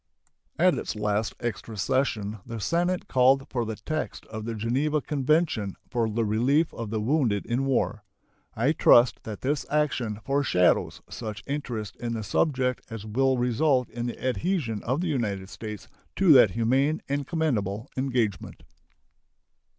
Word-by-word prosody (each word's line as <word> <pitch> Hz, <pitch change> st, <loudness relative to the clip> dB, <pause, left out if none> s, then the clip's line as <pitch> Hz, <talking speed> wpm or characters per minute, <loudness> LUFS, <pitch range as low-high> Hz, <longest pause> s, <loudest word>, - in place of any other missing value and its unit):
At -, -, +5 dB
its -, -, -4 dB
last 105 Hz, 0 st, -1 dB
extra 115 Hz, -1 st, -5 dB
session 110 Hz, -1 st, 0 dB
the 115 Hz, 0 st, -6 dB
Senate 175 Hz, -, 0 dB
called 135 Hz, +1 st, +4 dB
for 120 Hz, -3 st, -1 dB
the 110 Hz, 0 st, -4 dB
text 155 Hz, +9 st, -4 dB
of 110 Hz, -1 st, -7 dB
the 115 Hz, 0 st, -3 dB
Geneva 135 Hz, +8 st, 0 dB
convention 145 Hz, -, 0 dB, 0.2 s
for 115 Hz, -2 st, +1 dB
the 115 Hz, +1 st, 0 dB
relief 130 Hz, +10 st, +2 dB
of 115 Hz, -2 st, -5 dB
the 110 Hz, 0 st, -1 dB
wounded 115 Hz, -3 st, +1 dB
in 125 Hz, +3 st, 0 dB
war. 125 Hz, -4 st, 0 dB, 0.5 s
I 125 Hz, +6 st, +2 dB
trust 120 Hz, -5 st, +5 dB
that 110 Hz, -2 st, -6 dB
this 145 Hz, +2 st, 0 dB
action 130 Hz, -8 st, 0 dB
foreshadows 135 Hz, -11 st, +2 dB
such 110 Hz, -2 st, -6 dB
interest 125 Hz, -7 st, -4 dB
in 120 Hz, -1 st, -3 dB
the 110 Hz, -1 st, -3 dB
subject 125 Hz, +4 st, 0 dB
as 115 Hz, -2 st, -7 dB
will 130 Hz, +4 st, +1 dB
result 125 Hz, +2 st, +1 dB
in 120 Hz, +1 st, -3 dB
the 120 Hz, -, -5 dB
adhesion 125 Hz, -, -1 dB
of 130 Hz, +7 st, -1 dB
the 180 Hz, -, -1 dB
United 105 Hz, -10 st, -2 dB
States 105 Hz, 0 st, -7 dB, 0.3 s
to 190 Hz, -4 st, +5 dB
that 125 Hz, -7 st, +8 dB
humane 135 Hz, +7 st, +2 dB
and 140 Hz, -1 st, -2 dB
commendable 115 Hz, -, -1 dB
engagement. 125 Hz, -8 st, -2 dB
120 Hz, 150 wpm, -26 LUFS, 110-140 Hz, 0.5 s, that